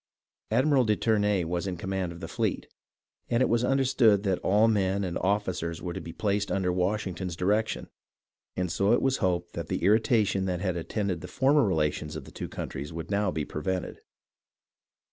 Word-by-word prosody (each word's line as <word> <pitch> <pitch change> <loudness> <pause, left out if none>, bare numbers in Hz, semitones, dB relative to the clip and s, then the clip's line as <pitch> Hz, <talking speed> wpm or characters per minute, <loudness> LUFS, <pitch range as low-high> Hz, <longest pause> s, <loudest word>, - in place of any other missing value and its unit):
Admiral 130 +4 +3
de 110 -2 +2
Ternay 105 -4 +1
was 85 +3 -2
in 90 -2 -3
command 95 0 -2
of 85 +1 -10
the 80 - -5
fleet, - - -2 0.6
and 120 +2 +3
it - - +3
was 120 +1 +2
understood 125 -6 +3
that 95 -3 0
all 105 +3 +3
men 100 -2 +1
and 90 -2 -3
officers 95 -4 -1
were 90 -2 -5
to - - -5
be 85 - -7
placed 100 +2 -1
under 90 -1 +1
Washington's 95 -1 -2
direction, 105 +5 0 0.7
and 90 -2 -1
so 100 +5 +2
it - - +3
was 135 -1 +2
hoped 90 -2 -1
that 85 -1 -5
the - - -3
irritation 105 -2 +3
that 90 -2 -1
had 90 -1 -1
attended 90 0 -2
the - - -7
former 140 +2 +3
relations 75 -3 -1
of - - -6
the - - -12
two - - -6
countries 70 +3 -6
would 80 +3 -6
now 100 0 +1
be 80 -4 -2
prevented. 90 +3 -4
95 Hz, 185 wpm, -28 LUFS, 90-105 Hz, 0.7 s, Admiral